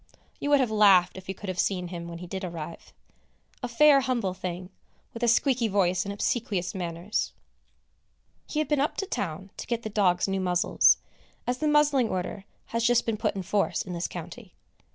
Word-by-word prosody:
You 285 - -2
would 290 -1 +5
have 250 -4 +1
laughed, 195 -4 +5
if 190 0 -10
you 190 - -3
could 205 - -9
have 185 -1 -3
seen 180 -3 0
him 170 -1 -6
when 170 0 -7
he 180 - -8
did 190 +2 -5
arrive! 170 -2 -7 0.7
A 245 - -2
fair 275 +3 +5
humble 240 -8 -1
thing, 180 0 -6 0.4
with 230 - -8
a 240 - +2
squeaky 240 0 +3
voice 190 -2 +1
and 200 - -3
obsequious 200 -3 -1
manners. 175 +2 -3 1.1
He - - -5
had 310 - +1
been 295 -2 +1
up 290 - -1
to 390 - -1
town 190 - -4
to - - -7
get 235 -1 -2
the 220 - -4
dogs 185 -4 +2
new 195 0 -1
muzzles, 180 -1 +4 0.5
as 250 +1 -1
the 310 - 0
muzzling 295 -5 +3
order 185 +2 -4 0.3
has 230 0 0
just 240 0 +3
been 225 - 0
put 215 -1 -1
in 190 - -3
force 200 +2 0
in 185 - -7
this 170 0 -2
county. 180 +4 -9
195 Hz, 200 wpm, -27 LUFS, 180-240 Hz, 1.1 s, would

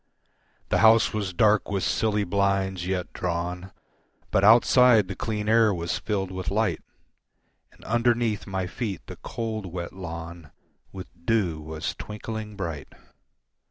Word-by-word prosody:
The - - +2
house 110 0 +5
was 105 -3 -2
dark 105 +3 +3
with 100 -3 -1
silly 105 +5 +1
blinds 95 -2 0
yet 90 -2 -3
drawn, 90 +1 -3 0.6
But 95 - +2
outside 115 0 +6
the 100 - -5
clean 105 0 -3
air 110 -1 +5
was 85 +1 -2
filled 95 -2 -2
with 95 -1 -4
light, 105 -5 0 0.9
And - - -19
underneath 120 -1 +1
my 95 -1 -2
feet 95 -1 -5
the - - -9
cold, 110 -3 -5
wet 85 -1 -6
lawn 85 -3 -8 0.4
With 95 -1 -7 0.2
dew 90 -9 +1
was 80 0 -4
twinkling 105 0 -7
bright. 85 -7 -5
95 Hz, 135 wpm, -26 LUFS, 90-110 Hz, 0.9 s, outside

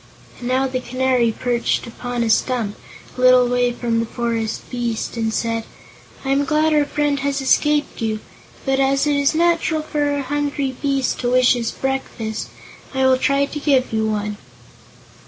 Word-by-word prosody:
And 240 - -5
now 260 +1 +2
the 260 -1 -2
Canary 255 -1 +1
perched 240 +1 -1
upon 245 0 -4
a 230 - -1
stump, 225 -3 0 0.4
a 250 - -5
little 255 -1 +6
way 245 0 +2
from 235 -1 -1
the 230 - -1
forest 230 -2 -3
beast, 240 -3 -3
and 225 -1 -1
said: 230 0 -1 0.6
"I 270 - 0
am 275 +1 +3
glad 305 +2 +2
our 295 -1 +3
friend 290 -1 0
has 280 0 -1
escaped 295 +1 +1
you; 220 -1 -1 0.5
but, 270 -1 +1
as 275 +1 +2
it 295 -1 +2
is 285 +2 +2
natural 335 -1 +2
for 295 -1 -1
a 285 - -2
hungry 285 -1 -2
beast 275 -2 0
to 245 - 0
wish 255 0 +5
his 235 -2 -2
breakfast, 250 -5 -3 0.5
I 265 0 +2
will 260 0 +4
try 280 +1 +2
to 295 - -6
give 270 -5 +2
you 220 0 +1
one." 210 -1 -2
255 Hz, 175 wpm, -20 LUFS, 235-280 Hz, 0.6 s, little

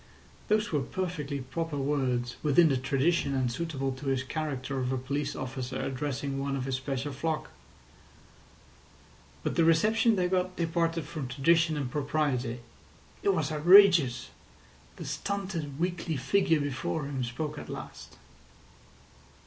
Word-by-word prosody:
Those 210 -1 +1
were 150 -3 +1
perfectly 150 -3 -3
proper 150 +4 -4
words, 130 -4 0
within 155 +2 +5
the 135 - +2
tradition 140 +3 +1
and 130 -2 +1
suitable 135 -1 -2
to 130 +2 -7
his 135 -1 +1
character 135 -2 -3
of 125 0 -1
a 130 - 0
police 140 +3 -2
officer 130 -1 -4
addressing 135 0 -3
one 140 0 -1
of 130 -2 -3
his 135 - -2
special 135 +2 -3
flock. 155 +3 -2 1.9
But - - -2
the 165 - +5
reception 215 +8 +4
they 180 -2 +1
got 185 0 0
departed 165 -1 0
from 150 -5 -5
tradition 160 +4 +2
and 135 -4 -3
propriety. 135 -5 -1 0.6
It - - +1
was 155 -2 -1
outrageous. 160 - +6 0.6
The - - -8
stunted, 185 -8 -3
weakly 170 -3 -1
figure 160 +3 +2
before 145 +2 -2
him 135 -2 -3
spoke 150 +5 -4
at - - -9
last. - - -8
145 Hz, 140 wpm, -29 LUFS, 130-165 Hz, 1.9 s, outrageous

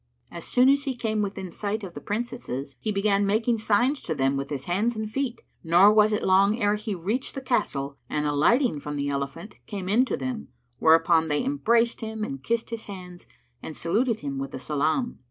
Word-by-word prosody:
As 170 -1 -8
soon 250 +1 +4
as 280 +1 +3
he 265 -2 -2
came 220 -3 -1
within 195 -3 -4
sight 210 +4 -3
of 185 -3 -7
the - - -8
Princesses, 205 - -4
he 215 - -2
began 200 0 +2
making 220 +3 +1
signs 240 +7 +2
to 160 - -3
them 135 0 +1
with 140 0 -3
his 140 -2 -4
hands 210 +7 0
and 220 0 -3
feet; 255 +2 -3 0.2
nor 180 +5 +6
was 215 0 +5
it 210 - 0
long 200 +4 +4
ere 205 -1 +2
he 210 -1 -3
reached 210 +10 -3
the - - -2
castle 140 - -1
and, 150 0 -1
alighting 155 - +2
from 145 +1 -5
the 140 0 -1
elephant, 140 +8 -4
came 195 -3 -5
in 220 +6 +4
to - - -2
them, 255 -4 -4 0.3
whereupon 165 0 +4
they 150 -1 0
embraced 235 -4 +1
him 220 -1 -4
and 135 -9 -5
kissed 235 0 -1
his 230 -1 -5
hands 180 -3 -10 0.3
and 155 - -7
saluted 225 +7 0
him 140 -2 -4
with 135 0 -4
the - - -7
salam. 155 - -1
205 Hz, 210 wpm, -26 LUFS, 160-230 Hz, 0.3 s, nor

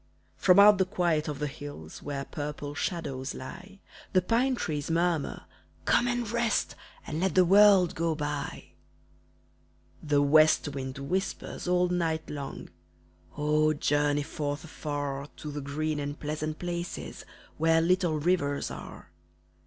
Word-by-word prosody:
From 180 -1 +4
out 205 0 +8
the 190 - +4
quiet 175 -5 0
of 150 -2 -3
the 150 - -2
hills, 145 - -8
Where 140 -1 -4
purple 145 -1 -5
shadows 140 -5 -3
lie, 195 +9 -10 0.3
The 185 -1 +4
pine 250 +6 +2
trees 150 -9 -3
murmur, 165 -2 0 0.4
"Come 245 - +3
and 240 -1 -1
rest 235 0 0 0.3
And 155 - -4
let 190 +1 0
the 185 -1 +6
world 195 -1 +6
go 165 -1 0
by." 145 -1 -4 1.3
The 145 -1 +2
west 155 +1 +5
wind 130 -2 -5
whispers 180 +7 -3
all 180 0 +3
night 165 -3 -1
long 140 -2 -6 0.7
"Oh, 150 +1 +2
journey 145 0 +1
forth 145 0 -4
afar 145 -3 -4
To 150 - -6
the 145 0 -5
green 150 +2 -2
and 145 0 -4
pleasant 155 +1 -3
places 175 0 -5 0.4
Where 165 +1 +4
little 175 -1 +2
rivers 145 -3 0
are!" - - -10
155 Hz, 135 wpm, -28 LUFS, 145-180 Hz, 1.3 s, out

